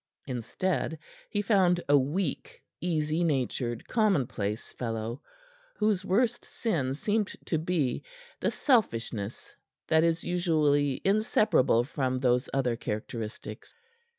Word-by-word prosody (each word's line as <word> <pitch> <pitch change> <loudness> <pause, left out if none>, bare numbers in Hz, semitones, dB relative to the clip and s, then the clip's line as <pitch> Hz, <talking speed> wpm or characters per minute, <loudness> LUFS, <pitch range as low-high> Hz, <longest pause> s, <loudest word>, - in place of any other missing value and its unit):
Instead, 155 +7 -2 0.3
he 205 -1 -1
found 190 -4 +4
a 145 - +5
weak, 145 +4 -1 0.2
easy 160 -1 0
natured, 130 -6 -1
commonplace 135 - 0
fellow, 115 +1 -4 0.5
whose 210 -3 +1
worst 230 +6 +1
sin 140 - -1
seemed 210 +6 0 0.2
to 160 - 0
be 160 -6 0 0.4
the - - +1
selfishness 115 - 0 0.4
that 160 0 +5
is 165 0 +1
usually 150 -6 +2
inseparable 195 - +3
from 130 -2 -1
those 125 -1 +2
other 130 -3 +1
characteristics. 110 0 -6
150 Hz, 105 wpm, -29 LUFS, 125-185 Hz, 0.5 s, a